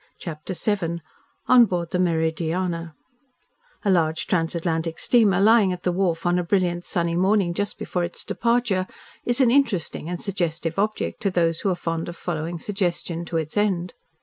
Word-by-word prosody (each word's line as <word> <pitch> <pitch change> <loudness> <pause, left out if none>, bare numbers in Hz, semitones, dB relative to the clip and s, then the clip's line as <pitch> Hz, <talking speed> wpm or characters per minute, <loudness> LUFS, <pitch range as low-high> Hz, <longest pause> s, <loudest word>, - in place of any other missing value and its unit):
CHAPTER 160 +2 -6
VII 170 -4 -1 0.5
ON 245 -2 +7
BOARD 175 -4 -3
THE 180 - 0
"MERIDIANA" 165 0 -1 0.9
A 200 - +4
large 160 -3 +1
transatlantic 165 -1 -1
steamer 210 -7 +3
lying 210 -1 +5
at 180 0 -5
the 180 - +1
wharf 175 -2 0
on 175 +1 +2
a - - 0
brilliant, 175 -1 0
sunny 170 -3 0
morning 190 0 +2
just 205 +3 -2
before 180 - -2
its 175 - -5
departure 235 -6 0 0.4
is 245 +2 +2
an 245 -3 +5
interesting 230 - +1
and 175 -1 -3
suggestive 170 -4 -2
object 215 +1 -1
to 200 - +1
those 165 -3 +1
who 200 - 0
are 185 - +1
fond 165 -1 -3
of 175 - -7
following 170 -1 -4
suggestion 175 -3 -2
to 170 - -2
its 155 -1 -3
end. 190 -4 0
175 Hz, 170 wpm, -24 LUFS, 165-195 Hz, 0.9 s, ON